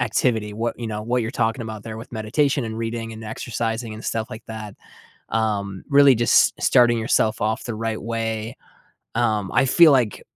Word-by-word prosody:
activity, 110 -2 0
what 115 +3 -3
you 120 - -4
know, 105 -1 -4
what 120 +2 0
you're 110 - -3
talking 115 0 -1
about 110 -2 -7
there 110 -1 -7
with 115 +2 -10
meditation 130 +5 0
and 110 -1 -5
reading 115 0 -4
and 110 0 -9
exercising 115 +1 -4
and 110 - -10
stuff 115 0 -2
like 110 - -9
that, 110 -2 -7 0.6
um, 100 -4 -2
really 140 -2 +6
just 120 +1 +3
starting 120 -1 +4
yourself 110 -1 +1
off 110 +3 -1
the 120 - -4
right 110 0 -3
way. 115 0 -3 0.6
Um, 110 -4 0
I 130 +3 +3
feel 155 +4 +6
like, 120 -6 +1
115 Hz, 185 wpm, -22 LUFS, 110-120 Hz, 0.6 s, really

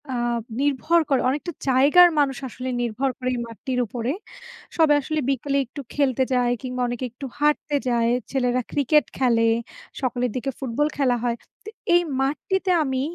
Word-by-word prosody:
আ - - -1 0.4
নির্ভর 290 +4 +2
করে 270 - +3
অনেকটা 300 +6 -2 0.2
জায়গার 290 +7 +7
মানুষ 270 -3 +1
আসলে 255 +1 -6
নির্ভর 240 +3 -1
করে 255 -1 -2
এই - - -3
মাঠটির 250 +3 -4
উপরে। 235 +3 -3 0.7
সবাই 315 -3 +5
আসলে 310 +2 -2
বিকেলে 275 +1 0
একটু 285 +4 -8
খেলতে 265 -3 +2
যায়, 245 -1 +2
কিংবা 250 0 -3
অনেকে 245 +1 -3
একটু 255 +4 -8
হাঁটতে 295 0 +1
যায়, 235 -1 +2 0.2
ছেলেরা 255 -2 +1
ক্রিকেট 295 +1 +3
খেলে, 230 -3 +3 0.5
সকালের 250 -2 -1
দিকে 270 +2 -2
ফুটবল 270 +3 0
খেলা 260 -4 +2
হয়। 235 -1 0 0.3
তো - - -6 0.3
এই 350 - +6 0.2
মাঠটিতে 370 +7 0
আমি 265 -2 -1
265 Hz, 160 wpm, -23 LUFS, 245-290 Hz, 0.7 s, জায়গার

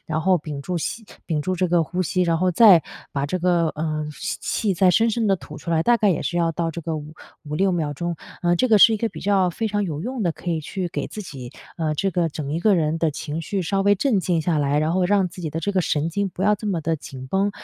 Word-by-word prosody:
然 160 0 -1
后 185 +2 +3
屏 150 -2 -6
住 180 +3 -3
吸 225 +8 -4 0.2
屏 155 -3 -1
住 185 +4 -2
这 185 - +1
个 170 -1 +3
呼 175 +5 -2
吸。 185 +2 0
然 170 -2 +2
后 180 +2 +2
再 180 -3 +7 0.3
把 140 0 -1
这 185 +5 -2
个， 175 -2 +2
呃， 155 0 -3
吸 - - -4
气 200 -4 -1
再 185 0 +4
深 225 +5 +3
深 225 0 0
地 195 - +4
吐 - - -11
出 170 - -6
来， 160 -1 +2
大 240 +6 +4
概 210 -3 +3
也 170 - 0
是 175 - -2
要 165 -1 +1
到 165 0 -2
这 170 +1 -6
个 160 -1 -3
五 150 +1 -8 0.3
5-6 160 +6 0
秒 155 -4 -1
钟。 170 +4 -3 0.3
呃， 175 0 +3
这 255 - +2
个 215 -2 +6
是 225 - +8
一 220 - +1
个 230 +2 -1
比 - - -10
较 195 -2 +2
非 225 +6 -3
常 205 0 0
有 155 -4 -4
用 250 0 -3
的， 175 -4 +1
可 175 - -5
以 165 -2 -1
去 180 +4 -4
给 - - -4
自 215 - -7
己， 130 -9 -9 0.3
呃， 155 -3 -1
这 195 +6 0
个 170 -1 0
整 145 -2 -5
一 165 - -1
个 210 +1 +4
人 160 -1 0
的 165 -1 +1
情 150 +2 -5
绪 190 +3 -2
稍 195 +4 0
微 200 +1 +4
镇 215 0 +1
静 175 -3 0
下 160 -1 +1
来， 145 0 +1
然 155 +2 +1
后 185 +1 +2
让 195 0 +2
自 180 +1 -11
己 160 - -3
的 160 +2 -3
这 200 +5 -1
个 190 - +2
神 155 -2 0
经 200 +3 -1
不 185 - -6
要 210 +2 +4
这 210 +1 -7
么 185 -5 0
地 165 +1 0
紧 130 -2 -9
绷。 195 +8 +1
175 Hz, 305 characters per minute, -23 LUFS, 155-195 Hz, 0.3 s, 是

